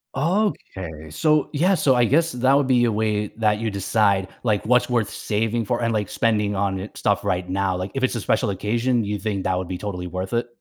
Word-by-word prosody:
Okay, 130 - -2
so 150 - +2
yeah, 180 +6 +3
so 145 -5 +3
I 120 -1 +4
guess 165 +7 +2
that 130 +2 +2
would 140 0 +3
be 125 -2 +3
a 115 - +1
way 105 -1 0
that 105 -2 +1
you 115 0 -1
decide, 100 -1 +1
like, 105 -4 0
what's 125 +3 +3
worth 115 -4 +1
saving 115 +2 -1
for, 120 +3 -1
and 115 -1 0
like, 105 -3 -1
spending 105 -3 0
on, 95 -1 -1
eh, 95 - -5
stuff - - 0
right 90 0 -1
now, 95 0 0
like, 90 +2 -4
if 135 - -3
it's 130 - +1
a 115 - -2
special 115 +2 +1
occasion, 115 +5 0
you 105 0 -3
think 100 -3 -2
that 90 -1 0
would 90 -1 -3
be 90 - -4
totally 90 -3 -5
worth 90 +3 -5
it? 120 +1 0
110 Hz, 230 wpm, -23 LUFS, 95-125 Hz, -, I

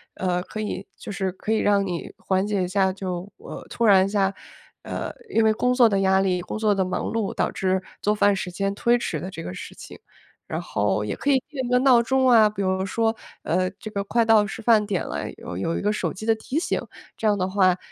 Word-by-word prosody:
呃， 180 -1 -1
可 215 +4 -8
以 210 -2 -4
就 - - -8
是 190 -1 -2
可 210 - -5
以 220 - +2
让 200 -1 +2
你 175 -3 -4
缓 190 +1 0
解 200 -3 0
一 - - -1
下， 190 +1 +2
就 185 0 -5 0.4
突 235 - -1
然 195 -3 +6
一 - - -4
下， 195 -1 +1 0.5
呃， - - -5 0.2
因 225 - +2
为 220 0 +4
工 250 +3 +1
作 250 -2 +6
的 200 -2 +1
压 190 0 +3
力， 185 -2 +1
工 180 - -5
作 215 -1 +2
的 195 -1 +1
忙 185 0 -2
碌 220 -3 -1
导 - - -1
致 190 0 0 0.2
做 210 +1 +1
饭 205 -1 +3
时 190 - -4
间 195 +2 -1
推 235 +4 +2
迟 165 -9 -3
的 185 - -5
这 190 - -7
个 90 - -6
事 - - -9
情， - - -11 0.5
然 - - -3
后 105 +1 -1
也 105 - -3
可 285 - -2
以 275 - +5
定 290 -4 -5
一 245 - -4
个 250 - +4
闹 250 -2 +5
钟 260 +2 +2
啊， 225 -4 +6
比 205 -1 -4
如 190 0 0
说， 225 +1 0 0.3
呃， 185 +2 +1
这 215 - -7
个 200 -1 -2
快 230 +3 +1
到 220 -2 +5
吃 225 - -7
饭 220 -2 +5
点 200 -4 -2
了， - - -4
有 85 - -8
有 130 - -1
一 - - -3
个 210 +1 +1
手 - - -2
机 210 +3 -8
的 225 - +4
提 240 +6 -5
醒， - - -1 0.3
这 220 - -1
样 205 -1 +3
的 185 0 0
话 185 -2 +3
200 Hz, 270 characters per minute, -24 LUFS, 185-220 Hz, 0.5 s, 然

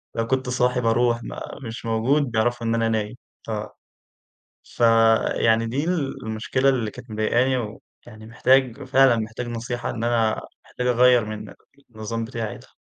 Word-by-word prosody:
لو 115 0 -1
كنت 130 -1 -1
صاحي 125 0 +1
باروح، 120 +1 +1
ما - - -7 0.3
مش 115 +1 -7
موجود 115 +6 +2
بيعرفوا 120 +1 0
إن 115 - +1
أنا 115 -1 +1
نايم. 110 +1 -2 0.3
ف - - -11 1.1
فيعني 115 0 +3
دي 130 +6 -2 0.4
المشكلة 110 +5 0
اللي 115 -5 0
كانت 125 -1 -12
مضايقاني، 120 +4 +1
ويعني 110 0 -9
محتاج 130 +3 +2
فعلًا 135 -2 +4
محتاج 115 +2 -4
نصيحة 120 +1 -4
إن 115 - -4
أنا 115 -2 +1 0.2
محتاج 125 0 -4
أغيّر 125 -1 +4
من 105 -2 -7 0.4
النظام 115 +1 -4
بتاعي 115 -2 -5
ده. - - -17
115 Hz, 145 wpm, -23 LUFS, 110-125 Hz, 1.1 s, فعلًا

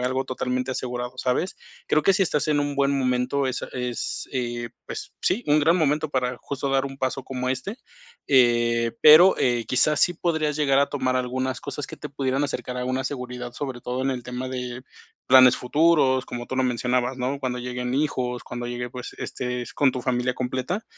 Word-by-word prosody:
algo 130 +1 0
totalmente 125 0 -2
asegurado, 125 -1 -4
¿sabes?, 130 +9 -1 0.3
creo 155 - +2
que 195 - +5
si 195 - +3
estás 150 -2 -1
en 150 -1 +2
un 145 0 -1
buen 140 0 +2
momento, 130 +2 0
es 130 - -3
es, 125 -1 -4
eh, 120 -2 -3 0.2
pues, - - -7
sí, 230 +6 +1
un 150 +1 +4
gran 165 +4 +4
momento 155 -1 +1
para 125 -2 -1
justo 140 0 -3
dar 135 0 +2
un 135 0 -8
paso 130 0 -2
como 125 -1 -4
este. 165 - -4 0.5
Eh, 120 -3 +3
pero, 160 +5 +8
eh, 120 -2 +1
quizás, 145 +4 +2
sí 175 - +3
podrías 160 -3 -1
llegar 140 -2 +3
a 140 - +3
tomar 130 -3 -1
algunas 130 +1 -2
cosas 145 - -5
que - - -9
te - - -7
pudieran 135 0 -1
acercar 125 -3 -3
a 125 - -2
una 130 +1 -1
seguridad, 125 -2 -5
sobre 130 -2 -5
todo 125 +2 -3
en 135 - +1
el 125 -2 -3
tema 125 +1 -5
de 125 -1 -5 0.4
planes 130 -1 +7
futuros, 140 -1 +3
como 120 0 -6
tú 130 - -4
lo 130 - +2
mencionabas, 125 +1 0
¿no?, 130 +2 -2
cuando 125 -2 -3
lleguen 125 0 -3
hijos, 125 -4 -1
cuando 120 0 -6
llegue, 120 0 -4
pues, 125 -1 -7
estés 125 -1 -4
con 140 -3 +3
tu 125 - -4
familia 125 -1 0
completa, 130 - -3
130 Hz, 195 wpm, -24 LUFS, 125-140 Hz, 0.5 s, pero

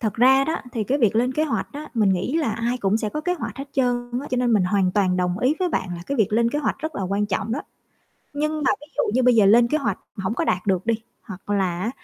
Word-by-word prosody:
Thật 215 -4 -1
ra 265 +3 +5
đó, 320 - -1 0.2
thì 220 -3 -2
cái 275 +6 0
việc 220 -3 +2
lên 250 +3 +2
kế 310 +4 +1
hoạch 300 - -2
á, 300 +1 -7
mình 215 -4 +3
nghĩ 190 - 0
là 290 -10 0
ai 235 +3 -2
cũng 200 0 +1
sẽ 215 -1 -2
có 300 - -4
kế 360 +3 -1
hoạch 330 - -6
hết 275 - -4
trơn 245 -2 0
á, 290 - -7
cho 255 - 0
nên 245 -1 +2
mình 200 -4 +3
hoàn 185 -1 +1
toàn 185 -3 +2
đồng 180 +1 0
ý 265 +6 +2
với 365 -1 +1
bạn 185 - -2
là 170 - -7
cái 280 - -2
việc 215 -3 +1
lên 235 +1 +2
kế 290 - -1
hoạch 290 - -1
rất 315 +1 -5
là 195 - -3
quan 200 +2 0
trọng 205 +2 -2
đó. 285 - -2 0.7
Nhưng 305 +1 -2
mà - - +3
ví 295 - -13
dụ - - +2
như 255 - +3
bây 250 -1 +5
giờ 210 -3 +5
lên 235 +3 +6
kế 310 - +1
hoạch 230 -9 -2 0.2
mà 195 - -5
hổng 220 - -1
có - - -1
đạt 180 +1 -1
được 190 -1 0
đi, 230 - +3 0.3
hoặc 195 -2 -10
là 185 -4 0
á, 225 - -1
230 Hz, 305 wpm, -23 LUFS, 200-275 Hz, 0.7 s, lên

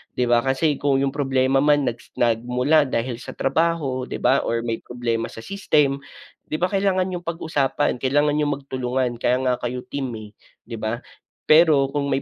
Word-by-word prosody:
di 125 - +1
ba 120 -1 +3
kasi 135 +4 +1
kung 140 -1 +2
yung 135 0 0
problema 135 -1 +1
man 145 -1 +3
nagsi 120 -1 -4
nagmula 125 +6 +2
dahil 120 0 -2
sa - - -9
trabaho 140 -3 0
'di - - -4
ba 135 - +3
or 115 0 -2
may 115 -1 -3
problema 115 -2 -3
sa - - -14
system. 150 -7 +1 0.5
'Di 155 - -1
ba 175 - +1
kailangan 195 -2 +1
niyong 175 -1 -6
pag-usapan, 145 -5 -1
kailangan 145 +3 +2
niyong 150 -1 +1
magtulungan 130 -3 -2
kaya 125 +1 +2
nga 125 - +3
kayo 125 +1 -4
team, 135 -2 -4
eh, 110 -1 -10 0.4
'di 115 0 -7
ba? 110 +2 -1 0.5
Pero 155 -4 +6
kung 140 -1 -1
may 135 - 0
135 Hz, 180 wpm, -22 LUFS, 125-150 Hz, 0.5 s, Pero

